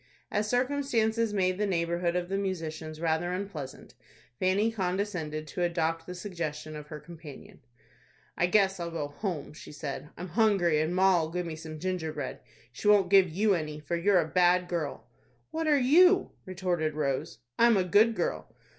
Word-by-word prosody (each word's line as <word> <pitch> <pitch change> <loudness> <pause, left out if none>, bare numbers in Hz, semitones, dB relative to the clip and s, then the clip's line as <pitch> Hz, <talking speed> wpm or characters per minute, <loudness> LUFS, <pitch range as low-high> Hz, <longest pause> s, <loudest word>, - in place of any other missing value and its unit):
As 210 +1 0
circumstances 245 -4 +1
made 185 -2 0
the 210 - +1
neighborhood 170 -1 0
of 180 -1 -1
the 195 +1 -1
musicians 160 -5 -4
rather 165 +1 0
unpleasant, 180 -9 -6 0.5
Fanny 200 +4 +2
condescended 180 -6 -2
to 180 - -4
adopt 165 -1 0
the 180 - -6
suggestion 165 -5 -5
of 150 -1 -8
her 150 0 -7
companion. 160 -4 -12 0.8
"I 175 - +2
guess 195 -1 +3
I'll 170 -1 -3
go 155 -3 -4
home," 150 -2 -4
she - - -11
said. 145 0 -6
"I'm 180 +1 -6
hungry, 175 -5 +3
and 160 +3 -1
ma'll 185 -4 +3
give 180 +1 -3
me 165 -2 -5
some 155 0 -8
gingerbread. 170 -2 -3 0.3
She 125 - -5
won't 200 -3 +5
give 195 -2 +6
you 200 +5 +2
any, 155 -3 -3
for 150 +3 -3
you're 185 +3 +3
a 160 - 0
bad 180 +1 +3
girl." 165 -5 -3 0.5
"What 320 0 -2
are 295 -1 +5
you?" 360 +9 +5 0.2
retorted 175 -4 -1
Rose. 140 -6 -2 0.2
"I'm 235 -2 +6
a 190 - +3
good 210 +6 +4
girl." 170 - -2
180 Hz, 170 wpm, -29 LUFS, 160-200 Hz, 0.8 s, give